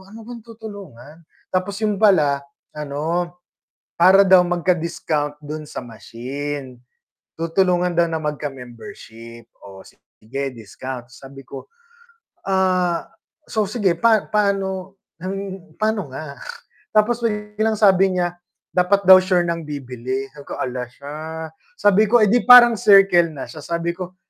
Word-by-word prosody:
"Ano 220 +3 -12
bang 240 0 -9
tutulungan?" 205 - -12 0.4
Tapos 185 +2 -1
'yun 210 -2 -1
pala 150 -10 +4 0.3
ano, 160 +4 -3 0.6
para 190 +3 +6
daw 185 -1 +7
magka-discount 170 -4 -1
do'n 150 0 -7
sa 130 - -7
machine. 130 +3 -7 0.6
Tutulungan 175 +1 +1
daw 170 - +4
na 160 - -2
magka 150 -1 -3
membership 115 - -12 0.2
o 95 -1 -12
sige 135 +5 -8
discount 120 +4 -8
sabi 135 +2 -13
ko, - - -10 0.8
"Ah, 185 -2 +1 0.4
so 215 -2 -1
sige 205 -4 +1
pa 225 -2 +3
paano 195 -2 -1 0.8
paano 215 -6 -1
nga?" 145 -1 -8 0.6
Tapos 230 +3 +2
biglang 210 0 -1
sabi 195 -2 +4
niya, 175 0 -1 0.4
dapat 185 +3 +3
daw 190 - +11
sure 185 -1 +2
ng 170 -1 -3
bibili, 130 -2 -5
sabi 145 -1 -12
ko - - -8
"Hala 125 -1 -3
siya!" 140 +3 -10 0.6
Sabi 205 +1 +4
ko, 235 +3 +4
"Eh, 215 - +5
'di 245 +2 +2
parang 245 -2 +9
circle 195 -5 +5
na 135 - -7
siya?" 155 - -10
Sabi 170 0 -2
ko 185 0 -7
175 Hz, 130 wpm, -20 LUFS, 140-200 Hz, 0.8 s, daw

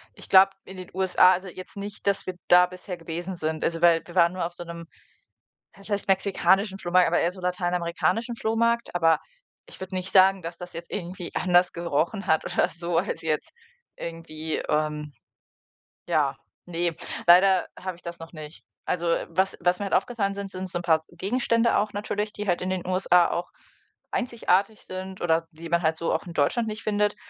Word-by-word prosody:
ich - - -11
glaube, 195 0 +7
in 190 - -10
den 185 -1 -9
USA 185 0 +5
also, 185 +1 -4
jetzt 185 +2 -9
nicht, 200 0 -7
dass 200 0 +1
wir 185 - -3
da 180 0 +7
bisher 180 0 -8
gewesen 175 +3 -5
sind. 160 -1 -3
Also, 165 0 -1
weil, 170 -1 +5
wir 175 - -12
waren 170 -1 +4
nur 185 -2 -2
auf 170 - -5
so 175 - -7
'nem 170 -1 -8 0.9
was 195 +2 -12
heißt 205 -1 -1
mexikanischen 195 0 +2
Flohmarkt, 180 0 +3
aber 170 - +2
eher 175 +2 +1
so 185 - -11
lateinamerikanischen 180 +5 -1
Flohmarkt, 230 -1 0
aber 165 -2 +4 0.5
ich - - -13
würde 190 0 -7
nicht 185 0 -4
sagen, 190 0 +6
dass 165 +1 -6
das 180 0 -9
jetzt 170 +1 -8
irgendwie 180 -2 -5
anders 180 0 +3
gerochen 170 +4 -1
hat 160 -2 +2
oder - - +1
so, 170 0 -2
als - - -1
jetzt 155 -2 -2 0.5
irgendwie, 160 -1 -5
ähm, 150 -1 -1 1.0
ja - - +1 0.3
ne, 170 -1 -2 0.3
leider 185 +2 +6
habe 185 -2 -5
ich - - -19
das 170 0 -7
noch 165 0 -10
nicht. 155 -1 -10 0.2
Also, 175 -1 -1 0.2
was 190 +3 0
was 180 +1 +2
mir 205 - -3
halt - - -1
aufgefallen 210 -5 0
sind, 200 -1 -6
sind 185 0 -6
so 175 - -2
'n - - -6
paar 160 -2 +3
Gegenstände 230 +5 +1
auch 210 +1 0
natürlich, 210 +1 -3
die 210 -1 -6
halt 175 0 +1
in 185 - -2
den 185 -2 -3
USA 185 -1 +4
auch 175 +1 -3 0.6
einzigartig 220 -4 0
sind 185 0 -7
oder 165 -1 +2
die 165 0 -10
man 170 +1 +1
halt 160 -1 +1
so 170 - -1
auch 160 - -2
in 175 - -7
Deutschland 225 +10 +1
nicht 215 +1 -5
findet, 210 -1 +1
180 Hz, 195 wpm, -26 LUFS, 170-195 Hz, 1.0 s, glaube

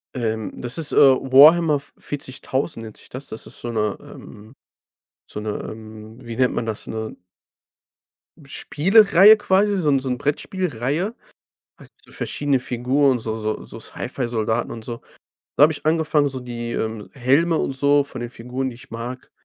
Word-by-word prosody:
Ähm, 110 -3 -2
das 120 +3 -4
ist, 160 -3 -2
äh, - - -2
Warhammer 145 +4 +6
v 140 - -11
40.000 135 -2 -4
nennt 110 -2 -10
sich - - -15
das. 130 +3 -8
Das 110 - -9
ist - - -11
so 120 - -5
'ne, 105 -2 -1
ähm 110 +5 -13 0.7
so - - -7
'ne, 105 0 -4 0.2
ähm, 110 0 -11
wie 115 -1 -7
nennt 125 -1 +2
man 115 - -3
das? 110 -2 -4
'Ne 110 0 -5 1.2
hm, 155 - -17
Spielreihe 195 +8 +5
quasi 200 0 +2
so 165 -5 +1
'n 140 -1 +3
so 130 0 -4
'n 125 - -1
Brettspiel-Reihe. 150 - -2 0.6
Hat - - -16
so - - -19
verschiedene 140 -2 -1
Figuren 125 +2 +1
so 110 0 -4
so 110 0 -3
so - - -10
Sci-Fi-Soldaten 115 -2 -3
und 115 -1 -8
so. 120 -1 -6 0.6
Da - - +4
habe 155 - +4
ich - - -9
angefangen, 155 -2 +2
so 135 -1 -6
die, 120 -1 -6
ähm, 110 -1 -4
Helme 140 +6 +2
und - - -1
so 140 +1 +3
von 130 -3 -9
den 120 0 -5
Figuren, 125 +2 -4
die 120 - -11
ich 120 - -16
mag 120 +3 -7
130 Hz, 175 wpm, -22 LUFS, 115-145 Hz, 1.2 s, Warhammer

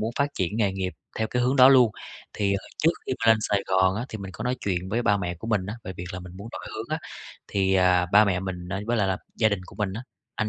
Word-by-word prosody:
muốn 110 +1 -1
phát 140 0 +2
triển 95 +3 -1
nghề 105 -4 +2
nghiệp 95 -1 -3 0.3
theo 110 - +1
cái 125 - +1
hướng 130 +3 +2
đó 130 -1 +9
luôn. 130 -4 +6 0.4
Thì, 100 -1 0
à, 100 - -2 0.2
trước 165 - +6 0.2
khi - - -1
mà 115 - 0
lên 110 - +1
Sài 100 -2 0
Gòn 95 0 +3
á, 115 +4 -3
thì 110 - -6
mình 95 -1 -7
có 100 - -6
nói 125 +1 0
chuyện 90 -2 -1
với 115 +4 0
ba 100 -3 +3
mẹ 90 -3 -3
của 100 +7 -9
mình 105 -5 0
á 105 - -4
về 95 - -5
việc 90 - -6
là 90 - -5
mình 90 -1 -10
muốn 100 +4 -8
đổi - - -6
hướng 110 +1 -5
á, 155 - -1 0.5
thì, 95 -1 +1
à, 90 -1 +4
ba 105 +2 +8
mẹ 95 -3 0
mình 90 -2 -5
ấy 95 +3 -3
với 120 +1 +1
lại 100 -3 +2
là 95 - +1 0.2
gia 110 - +4
đình 100 -3 -1
của - - -14
mình 105 -3 -1
á, 110 +5 -5 0.3
anh 110 - 0
100 Hz, 305 wpm, -25 LUFS, 95-110 Hz, 0.5 s, đó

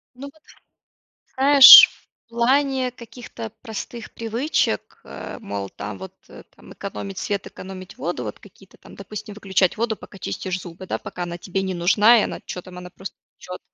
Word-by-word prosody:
Ну 275 +3 -9
вот. 315 - -27 1.0
Знаешь, 280 - +10 0.4
в - - -79
плане 260 +2 +1
каких-то 235 -1 -10
простых 225 +1 -8
привычек, 230 +7 -2
э, - - -9
мол, 100 - -6
там, 100 0 -8
вот, 95 - -10
э, - - -14
там, - - -15
экономить 100 -2 -7
свет, 200 -1 -3
экономить 185 -1 -11
воду, 160 -8 -4
вот 105 - -7
какие-то 195 -1 -19
там, - - -16
допустим, 210 +1 -9
выключать 190 -3 0
воду, 225 -1 -2
пока 195 - -14
чистишь 185 0 -4
зубы, 175 +1 -11
да, - - -3
пока 175 - -7
она 170 0 -6
тебе 190 +2 -3
не 190 -1 -3
нужна 205 +7 +4
и - - +1
она, - - -5
чё 180 - -6
там, 180 -1 -12
она 180 0 -10
просто 190 +1 -10 0.2
течет, 180 0 -9
195 Hz, 175 wpm, -22 LUFS, 180-235 Hz, 1.0 s, Знаешь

